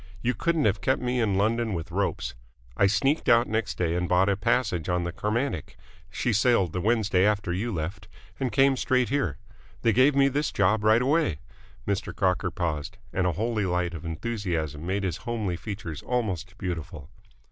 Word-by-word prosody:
You 125 - +2
couldn't 165 0 0
have 100 -2 +1
kept 130 +8 +1
me 125 0 -1
in 105 -5 +1
London 110 +2 +1
with 85 +1 -5
ropes. 100 +2 -1 0.4
I 100 - +4
sneaked 135 +9 +1
out 120 +1 +5
next 110 0 -2
day 85 -2 0
and 90 0 -1
bought 90 +2 +4
a 100 - +2
passage 105 -6 0
on 90 0 +1
the 85 - -3
Carmantic 105 - -2 0.3
she 120 - -1
sailed 105 -6 +3
the 90 - -2
Wednesday 105 -3 +2
after 100 -3 +1
you 110 +6 -2
left 90 +2 -4 0.3
and 130 -3 -1
came 135 0 +4
straight 125 -1 +1
here. 100 - 0 0.5
They 115 - +4
gave 135 +4 +4
me 140 0 +5
this 145 +2 0
job 105 +2 +2
right 110 +3 +4
away." 145 - +2 0.5
Mr. 100 -1 -2
Crocker 90 -2 +1
paused, 85 -1 -3 0.2
and 90 -1 +1
a 90 - +1
holy 110 0 -1
light 90 -1 0
of 80 - -7
enthusiasm 85 -4 -3
made 100 +2 -1
his 90 -3 -1
homely 110 -5 -3
features 90 -4 -6
almost 100 -6 -2
beautiful. 80 -7 -5
100 Hz, 185 wpm, -26 LUFS, 90-120 Hz, 0.5 s, out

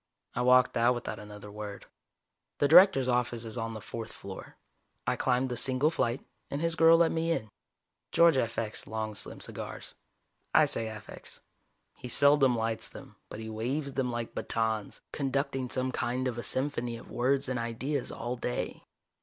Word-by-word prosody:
I 125 - -1
walked 125 0 +5
out 120 +2 +4
without 120 - -5
another 105 0 -10
word. 105 -1 -7 0.7
The 145 - +3
Director's 165 -4 +7
office 120 -2 0
is 110 - -6
on 115 -1 -3
the - - -5
fourth 115 +1 -6
floor, 95 -1 -10 0.5
I - - +1
climbed 130 0 +1
the 125 - -2
single 130 +5 +3
flight, 125 -5 -1 0.2
and 140 - -3
his 165 +1 +1
girl 165 -1 +6
let 165 -1 +4
me 165 0 0
in. 110 -10 -2 0.6
George 170 -2 +6
affects 115 -3 -2
long 110 -1 -3
slim 100 - -4
cigars. - - -6 0.6
I - - +7
say 115 - -1
affects. 110 -2 -9 0.5
He - - -9
seldom 140 0 +5
lights 115 0 -2
them, - - -12
but - - -8
he 110 - -6
waves 130 +6 -3
them 130 -2 -1
like 120 -1 -4
batons, 110 -2 -2
conducting 135 -2 -1
some 130 +1 -1
kind 125 +1 -1
of 120 -2 -3
a - - -2
symphony 125 -3 -1
of - - -13
words 135 +3 +1
and 125 -2 -1
ideas 120 +4 -2
all 120 +1 -4
day. 120 +1 -3
125 Hz, 170 wpm, -30 LUFS, 115-140 Hz, 0.7 s, Director's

